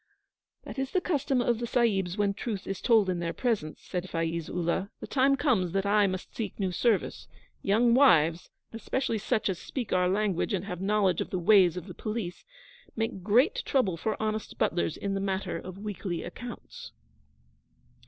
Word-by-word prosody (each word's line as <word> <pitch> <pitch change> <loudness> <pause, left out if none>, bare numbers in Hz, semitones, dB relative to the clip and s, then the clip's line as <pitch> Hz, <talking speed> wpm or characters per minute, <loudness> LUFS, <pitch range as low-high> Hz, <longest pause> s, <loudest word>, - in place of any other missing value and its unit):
'That - - -7
is 270 0 -1
the 370 - +4
custom 285 -7 0
of 240 -2 +1
the 240 - -3
Sahibs 205 -7 +1
when 205 -1 +2
truth 200 -2 -4
is 195 -1 -4
told 225 -5 +4
in 180 -2 -1
their 170 -1 -2
presence,' 215 -12 -2
said 180 -1 -4
Faiz 165 0 -2
Ullah. 180 +3 -1
'The - - -6
time 275 0 +3
comes 220 - +1
that 195 0 0
I 205 0 +4
must 185 -1 -5
seek 225 - -4
new 190 -2 0
service. 215 +2 0 0.3
Young 230 +4 +3
wives, 170 - +4 0.2
especially 230 0 -2
such 220 +1 0
as 190 -3 -2
speak 250 -5 -4
our 180 0 +3
language 200 0 0
and 190 -1 -1
have 180 -3 -5
knowledge 195 -3 +2
of - - -4
the 185 - -2
ways 180 -1 +5
of 180 - -5
the 185 - -9
Police, 210 -3 -5 0.5
make 225 -4 -2
great 250 - +3
trouble 215 -10 +1
for 215 +6 -3
honest 215 -1 -3
butlers 170 -1 0
in 200 -1 -2
the 195 - -1
matter 195 0 -2
of 185 0 -9
weekly 200 -4 -4
accounts.' 475 - -9
200 Hz, 185 wpm, -28 LUFS, 180-235 Hz, 0.5 s, ways